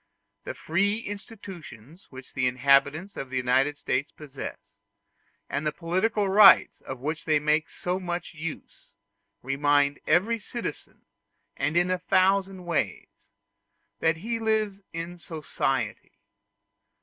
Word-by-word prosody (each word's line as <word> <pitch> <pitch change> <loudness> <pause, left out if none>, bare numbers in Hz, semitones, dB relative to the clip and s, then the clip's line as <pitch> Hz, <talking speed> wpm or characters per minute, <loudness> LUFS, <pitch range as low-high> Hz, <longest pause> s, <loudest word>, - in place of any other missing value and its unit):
The - - -5
free 200 +6 +1
institutions 195 - -9
which 130 -1 -12
the 130 -2 +1
inhabitants 140 +8 +2
of 135 - -5
the 130 - -3
United 130 +4 +2
States 135 +2 -1
possess, 140 -3 -9 0.7
and 145 - -2
the 150 - 0
political 190 +6 0
rights 195 0 +7
of 135 - -6
which 155 +3 -3
they 155 -2 +3
make 150 +1 +1
so 180 +1 -3
much 175 -1 -4
use, 160 -1 -8 0.5
remind 145 +1 +2
every 200 +9 +3
citizen, 235 +3 -7 0.5
and 150 +4 0
in 175 +1 +3
a 185 - 0
thousand 190 0 +2
ways, 170 -3 -3 0.7
that 160 0 +2
he 230 +6 -3
lives 215 -3 0
in 170 +1 -6
society. 160 -4 -3
165 Hz, 125 wpm, -27 LUFS, 145-195 Hz, 0.7 s, rights